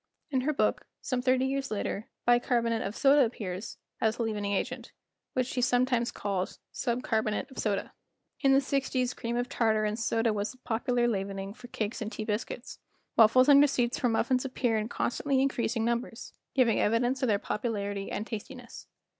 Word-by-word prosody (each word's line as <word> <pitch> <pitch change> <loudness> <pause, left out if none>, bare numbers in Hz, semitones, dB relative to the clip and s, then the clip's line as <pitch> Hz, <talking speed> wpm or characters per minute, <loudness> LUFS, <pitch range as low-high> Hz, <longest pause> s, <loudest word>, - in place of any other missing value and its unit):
In 260 -2 +1
her 290 +4 +1
book, - - 0 0.2
some 255 -1 -1
thirty 255 0 +2
years 270 0 -1
later, 210 0 -3 0.2
bicarbonate 240 -2 +2
of 200 - -4
soda 280 0 +5
appears 205 -4 -4 0.2
as 220 +1 +1
a 235 - 0
leavening 210 -2 -2
agent, 240 +4 -3 0.4
which 255 - +1
she 250 0 -2
sometimes 245 -1 +2
calls 195 -2 -3
"sub 245 0 -2
carbonate 220 +2 -1
of - - -9
soda." 200 -2 -1 0.5
In 275 - +4
the 270 - +5
sixties 265 -2 0
cream 235 0 -3
of 245 0 0
tartar 220 -3 +1
and 210 +2 -2
soda 225 0 +1
was 205 +2 -2
the - - -20
popular 240 +1 +1
leavening 195 -2 -3
for 245 +2 -12
cakes 220 -1 -3
and 215 0 -3
tea 215 - -5
biscuits; 225 +3 -4 0.4
waffles 235 +4 +6
and 285 -1 +8
receipts 250 -4 +2
for 245 - +2
muffins 250 +3 +1
appear 255 -3 0
in 215 +1 -1
constantly 270 +3 0
increasing 240 -4 0
numbers, 235 0 -3 0.2
giving 245 -4 +4
evidence 240 +4 +1
of 260 - +2
their 210 -3 +3
popularity 205 -2 -3
and 210 - -3
tastiness. 240 +2 -8
235 Hz, 180 wpm, -29 LUFS, 215-255 Hz, 0.5 s, and